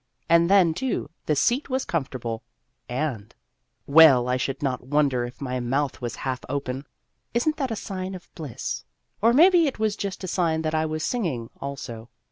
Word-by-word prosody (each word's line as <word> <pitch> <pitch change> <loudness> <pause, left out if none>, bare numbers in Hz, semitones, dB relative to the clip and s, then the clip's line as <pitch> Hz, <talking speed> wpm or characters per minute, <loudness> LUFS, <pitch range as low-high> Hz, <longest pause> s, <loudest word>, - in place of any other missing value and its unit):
And 170 +1 +5
then, 190 -5 +5
too, 250 - -2 0.2
the 150 - +2
seat 245 - +1
was 260 0 -1
comfortable, 125 -7 -3 0.5
and 125 -5 -3 0.5
well, 140 -5 +7
I 125 - +2
should 135 +2 -2
not 130 -3 -1
wonder 135 -4 +2
if 120 - -10
my 130 -2 -3
mouth 135 +3 -1
was 120 -1 -3
half 130 -1 -1
open 135 0 -3 0.5
(is 240 +5 +1
n't 310 0 +2
that 270 -3 -1
a 225 - -2
sign 190 -2 -5
of 180 - -13
bliss? 145 -9 -5 0.4
or 230 +2 +5
maybe 340 +4 +6
it 275 - -3
was 215 -2 0
just 200 -1 -5
a - - -3
sign 165 -3 0
that 155 0 -1
I 160 0 +1
was 155 0 -3
singing 155 - -2
also). 130 -5 -6
155 Hz, 185 wpm, -25 LUFS, 130-195 Hz, 0.5 s, well